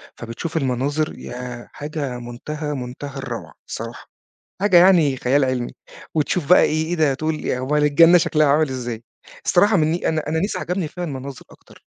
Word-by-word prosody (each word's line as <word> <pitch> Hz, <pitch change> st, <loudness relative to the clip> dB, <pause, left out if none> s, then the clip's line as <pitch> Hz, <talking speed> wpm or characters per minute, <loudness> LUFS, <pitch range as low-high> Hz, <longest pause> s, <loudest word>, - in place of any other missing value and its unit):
فبتشوف 120 Hz, +8 st, -5 dB
المناظر 140 Hz, +2 st, -1 dB
ياه! 125 Hz, -1 st, -7 dB
حاجة 145 Hz, -4 st, -4 dB
منتهى، 150 Hz, +6 st, -5 dB
منتهى 130 Hz, +1 st, -6 dB
الروعة 125 Hz, -4 st, -6 dB, 0.2 s
الصراحة. -, -, -7 dB, 0.5 s
حاجة 200 Hz, -3 st, +5 dB
يعني 170 Hz, -7 st, +5 dB
خيال 135 Hz, +3 st, +2 dB
علمي. 130 Hz, -2 st, -2 dB, 0.4 s
وتشوف 155 Hz, 0 st, 0 dB
بقى 180 Hz, -, +8 dB
إيه 155 Hz, +1 st, +1 dB
إيه 175 Hz, +2 st, -2 dB
ده 155 Hz, -4 st, +2 dB
تقول 155 Hz, +2 st, -3 dB
"أومّال 135 Hz, +4 st, 0 dB
الجنّة 165 Hz, +4 st, +6 dB
شكلها 155 Hz, -2 st, +2 dB
عامل 150 Hz, +1 st, +3 dB
إزاي؟" 120 Hz, -3 st, -5 dB, 0.4 s
الصراحة 200 Hz, +3 st, +4 dB
من 155 Hz, -1 st, +2 dB
ن -, -, +1 dB
أنا 155 Hz, -1 st, 0 dB
أنا 160 Hz, +1 st, 0 dB
نيس 200 Hz, +5 st, -1 dB
عجبني 180 Hz, -1 st, -2 dB
فيها 180 Hz, +4 st, -7 dB
المناظر 135 Hz, -4 st, -6 dB
أكتر، -, -, -19 dB
150 Hz, 165 wpm, -21 LUFS, 130-160 Hz, 0.5 s, بقى